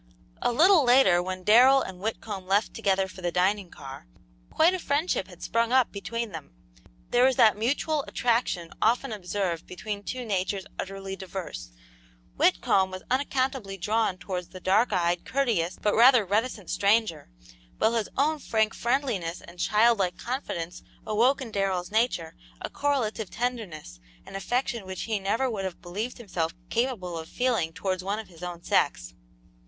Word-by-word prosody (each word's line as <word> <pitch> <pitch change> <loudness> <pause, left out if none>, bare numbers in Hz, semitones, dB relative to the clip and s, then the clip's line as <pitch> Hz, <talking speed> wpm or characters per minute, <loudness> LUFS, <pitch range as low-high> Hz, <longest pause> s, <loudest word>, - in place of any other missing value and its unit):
A - - +2
little 330 +5 +5
later, 245 -9 +5
when 185 0 -5
Darrell 255 +6 +6
and 185 -1 -8
Whitcomb 205 -2 -4
left 200 +3 +1
together 195 -1 +1
for 185 0 -12
the 175 -1 -1
dining 190 +2 +1
car, 135 - -10 0.4
quite 335 +3 +4
a 370 - -2
friendship 285 - 0
had 180 -2 -13
sprung 230 0 0
up 260 -2 +4
between 230 +2 -4
them. - - -9 0.6
There 245 - +4
was 260 0 +4
that 220 -2 +5
mutual 280 +7 0
attraction 230 -8 0
often 240 +3 +2
observed 185 -4 -3
between 200 +3 -5
two 250 +4 -5
natures 195 -1 -1
utterly 195 0 -5
diverse. 185 - -7 0.7
Whitcomb 190 - +3
was 185 0 -8
unaccountably 260 -6 -1
drawn 210 0 0
towards 180 -2 -5
the 185 +1 -10
dark 200 +6 +2
eyed, 175 -2 +1
courteous, 215 -11 0
but 210 - +1
rather 240 -1 +6
reticent 210 0 -1
stranger, 205 - +1 0.5
while 220 - +2
his 225 -2 -1
own 300 +2 +2
frank 220 -4 0
friendliness 235 -9 -1
and 175 +1 -14
childlike 210 -3 +3
confidence 180 - -4 0.2
awoke 240 +6 +2
in 230 - -8
Darrell's 195 -2 -1
nature 215 -8 0 0.3
a - - -6
correlative 235 -8 -1
tenderness 215 - -4 0.3
and - - -10
affection 235 +1 -2
which 190 -1 -5
he 220 -2 -1
never 220 +7 0
would 215 -6 -3
have 190 -2 -5
believed 205 +8 -5
himself 180 -8 -3 0.2
capable 220 -9 -1
of 160 - -9
feeling 235 -10 0
towards 185 +1 -3
one 200 +2 -2
of 220 -2 -7
his 170 -2 -16
own 175 -1 -6
sex. - - 0
205 Hz, 160 wpm, -27 LUFS, 185-240 Hz, 0.7 s, Darrell